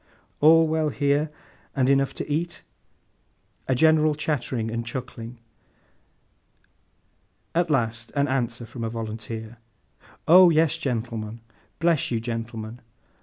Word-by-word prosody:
'All 160 +2 +6
well 155 -1 +1
here? 145 +2 +1 0.5
And 130 -2 +2
enough 135 0 +2
to - - -5
eat?' 165 +4 -2 1.0
A 130 - +2
general 155 +1 +4
chattering 130 -7 -2
and 115 0 -2
chuckling; 120 -1 -7 2.2
at 170 0 +1
last 120 -4 -1
an 140 0 +2
answer 120 -3 -2
from 115 +1 -8
a 115 - -1
volunteer. 110 0 -6 0.7
'Oh 180 +2 +8
yes, 160 0 +2
gentleman! 115 -5 -4 0.4
Bless 165 -2 +2
you, 115 - 0
gentleman! 115 0 -5
130 Hz, 115 wpm, -25 LUFS, 115-155 Hz, 2.2 s, Oh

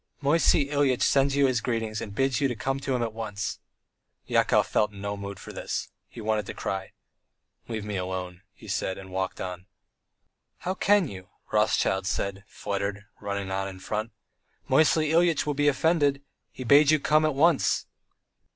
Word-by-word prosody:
"Moisey 145 -1 +3
Ilyitch 140 -4 +2
sends 135 0 +3
you 140 -1 +4
his 130 -4 +1
greetings 115 -3 -2
and 100 - -7
bids 135 +2 +1
you 135 -3 +1
come 135 +4 -2
to 135 -1 -1
him 120 - 0
at 115 -2 -3
once." 105 -3 -4 0.7
Yakov - - +3
felt 105 0 +1
in 100 - -12
no 100 +1 -3
mood 100 -1 -7
for - - -10
this. - - -4 0.2
He - - -11
wanted 110 -2 -1
to - - -6
cry. 95 -1 -4 0.7
"Leave 110 -3 -4
me 105 -2 -3
alone," 90 -1 -4
he - - -15
said, 95 -1 -2
and 95 -1 -10
walked 95 0 -3
on. 90 0 -6 0.9
"How 185 - -1
can 200 -1 +3
you," 95 -6 -10 0.2
Rothschild 95 0 +2
said, 100 -1 -2
fluttered, 100 0 -4
running 100 -2 -4
on 95 0 -1
in 95 -1 -8
front. 110 +4 -3 0.6
"Moisey 155 +2 +3
Ilyitch 170 -2 +3
will 150 - 0
be 145 +1 +1
offended! 145 -1 +2 0.3
He 130 - -7
bade 140 +4 +6
you 155 0 +5
come 155 +2 +3
at 155 -2 +1
once!" 160 +1 +3
115 Hz, 175 wpm, -27 LUFS, 100-140 Hz, 0.9 s, bade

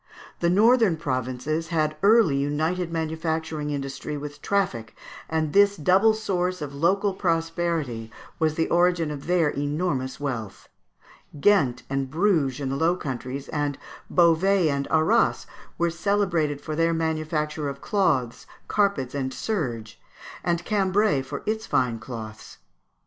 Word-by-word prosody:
The 170 - +2
northern 215 -1 +4
provinces 135 +2 -2
had 155 -3 0
early 210 -7 +5
united 160 +5 -1
manufacturing 160 -1 -2
industry 140 +1 -4
with 145 0 -8
traffic, 155 - -1 0.3
and 160 -2 -1
this 200 0 +5
double 190 +7 +4
source 185 -4 -1
of 145 -2 -6
local 190 +7 +1
prosperity 165 - -1 0.3
was 155 -1 +1
the 160 - 0
origin 175 -2 +2
of 145 0 -7
their 175 -3 +3
enormous 145 -2 -2
wealth. 120 -8 -5 0.7
Ghent 140 -10 +3
and 135 -1 -2
Bruges 155 -5 +1
in 135 -2 -3
the 135 - -2
Low 165 +4 +2
Countries, 135 -3 -5
and 145 -2 -2 0.3
Beauvais 175 +1 +4
and 140 -1 -1
Arras, 160 +9 +2 0.3
were 170 0 +1
celebrated 170 -5 0
for 155 - -4
their 165 +1 +2
manufacture 155 -2 -2
of 140 0 -7
cloths, 135 - 0 0.2
carpets, 195 -12 0
and 135 -2 -2
serge, 120 - -4 0.4
and 170 -1 -1
Cambrai 200 -6 +2
for 140 +2 -7
its 220 +1 -2
fine 120 -3 +1
cloths. 110 -2 -9
160 Hz, 135 wpm, -25 LUFS, 140-180 Hz, 0.7 s, early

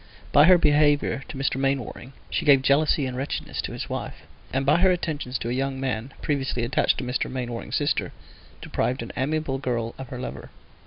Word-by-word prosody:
By 145 - +7
her 180 +1 +8
behaviour 145 -3 +3
to - - -7
Mr. 135 -1 0
Mainwaring 135 -1 -2 0.2
she - - 0
gave 140 -3 +6
jealousy 145 +1 +3
and 130 -1 -4
wretchedness 135 +3 -3
to - - -5
his - - -5
wife, - - -5 0.3
and 135 +1 0
by 145 +3 +5
her 190 +1 +5
attentions 155 -7 -1
to 115 - -4
a - - -1
young 135 +1 -1
man 130 -1 -2
previously 135 -4 -1
attached 120 +3 +2
to - - -3
Mr. 125 +1 -1
Mainwaring's 120 -2 -4
sister - - 0 0.5
deprived 125 -1 -1
an 115 - -7
amiable 140 0 -1
girl 115 -3 -2
of 135 - -6
her 125 - -7
lover. 125 - -6
135 Hz, 195 wpm, -25 LUFS, 125-145 Hz, 0.5 s, her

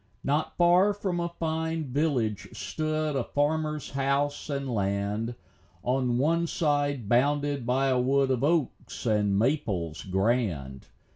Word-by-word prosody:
Not 145 +3 -1
far 180 +4 +5
from 190 -4 -2
a 170 0 -1
fine 160 -1 -2
village 125 -8 -1
stood 155 +8 -2
A 135 - +1
farmer's 150 +2 -1
house 140 +2 -1
and 140 -1 -2
land, 105 +1 -1 0.5
On 125 -1 +1
one 165 +5 +2
side 145 -7 0
bounded 140 +2 +1
by 135 +2 +2
a 130 -1 +2
wood 135 +1 +2
Of 130 0 0
oaks 155 -4 -1
and 105 -3 +2
maples 100 - 0
grand. 95 - -1
135 Hz, 130 wpm, -27 LUFS, 115-155 Hz, 0.5 s, far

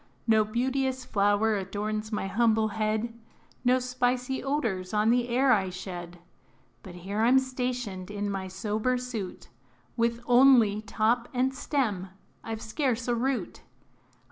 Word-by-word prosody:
No 220 -2 +4
beauteous 260 +3 -1
flower 205 0 +2
adorns 210 +3 -3
my 210 - -2
humble 220 +1 +2
head, 220 +2 -1 0.5
No 250 0 +4
spicy 250 +1 -1
odors 220 -10 -2
on 210 +2 +3
the 245 0 +1
air 255 +2 +3
I 195 -5 +3
shed; 175 -1 -7 0.6
But 180 - -11
here 195 +4 -3
I 225 - +4
'm 260 +2 +6
stationed 250 -7 -2
in 205 0 -3
my 195 -1 -3
sober 215 +6 -1
suit, 240 -7 -6 0.5
With 235 0 +1
only 240 -5 +5
top 225 +3 0
and 260 +2 +1
stem 235 -10 -1 0.4
I 225 - -4
've 220 - -9
scarce 250 0 -1
a 240 - +2
root. 255 +3 -2
225 Hz, 140 wpm, -28 LUFS, 205-250 Hz, 0.6 s, m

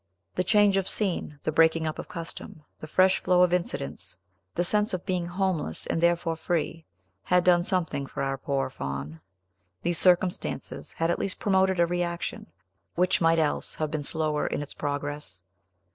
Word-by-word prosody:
The 180 - 0
change 205 0 +4
of 195 - 0
scene, 180 -7 -1
the - - 0
breaking 160 +1 +4
up 155 - -3
of - - -6
custom, 165 -2 -8 0.2
the 155 - -8
fresh 185 +4 +4
flow 180 0 +4
of 180 -1 +3
incidents, 80 - -3 0.4
the 175 - +1
sense 210 +2 +1
of 180 - -7
being 180 -3 -1
homeless, 175 - -1
and 165 - -1
therefore 170 -1 +2
free, 165 0 -2 0.4
had 180 - +2
done 175 -1 +5
something 175 -7 -1
for 135 - -4
our 135 0 -2
poor 135 -1 -1
Faun; 70 - -5 0.6
these 175 -3 +1
circumstances 180 +1 +1
had 165 +1 0
at - - -1
least 195 - -2
promoted 190 -2 +2
a 170 - +6
reaction, 175 0 -3 0.5
which 180 +1 +2
might 165 0 +4
else 155 -2 0
have 155 -1 -2
been 155 -1 -2
slower 155 0 -1
in - - -2
its 145 - -10
progress. 145 -9 -4
170 Hz, 175 wpm, -27 LUFS, 150-180 Hz, 0.6 s, a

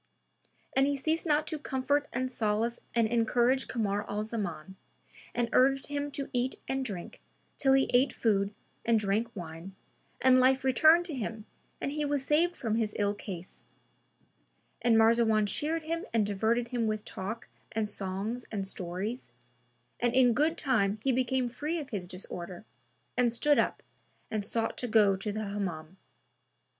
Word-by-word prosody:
And 270 +1 +4
he 285 0 0
ceased 320 +5 -1
not 300 0 +3
to 315 -1 -4
comfort 285 +1 0
and 255 +1 -2
solace 225 0 0 0.2
and 230 -1 +4
encourage 240 +3 +2
Kamar 205 -4 -1
al 210 +1 -1
Zaman 190 -5 -5 0.6
and 240 -1 +1
urged 270 +1 +4
him 290 0 -3
to 275 -1 -3
eat 250 +1 -1
and 265 0 -1
drink 195 -8 -6 0.4
till 270 -1 +4
he 270 0 +4
ate 255 +3 +4
food 200 -3 +1 0.3
and 230 -1 +3
drank 210 +2 +1
wine, 170 +1 -8 0.4
and 255 0 +6
life 260 +1 +4
returned 315 +7 +5
to 335 - -6
him 225 -4 -4 0.3
and 275 - -2
he 300 +1 -2
was 285 -2 0
saved 335 +5 +2
from 225 -2 -1
his 220 -2 -1
ill 205 -1 +1
case; 185 -3 -8 1.2
and 230 -1 +4
Marzawan 225 -1 +4
cheered 310 +10 -1
him 330 +2 -3
and 215 -2 +4
diverted 225 +4 0
him 235 -2 0
with 215 -1 -2
talk 215 +5 -5 0.2
and 220 -1 -1
songs 205 +4 -4
and 200 -3 -2
stories, 190 - -5 0.7
and 240 0 +1
in 250 -2 +6
good 310 +7 +2
time 220 -7 +1
he 270 - +3
became 255 0 +1
free 300 +7 -3
of 290 -4 -6
his 190 -5 -4
disorder 180 -1 -7 0.5
and 245 -1 +3
stood 290 +5 +3
up - - 0 0.5
and 215 -2 -1
sought 225 +3 -2
to 245 - -2
go 215 -3 +5
to 195 +2 -3
the 215 +1 -3
Hammam. 190 -4 -4
235 Hz, 165 wpm, -30 LUFS, 205-265 Hz, 1.2 s, and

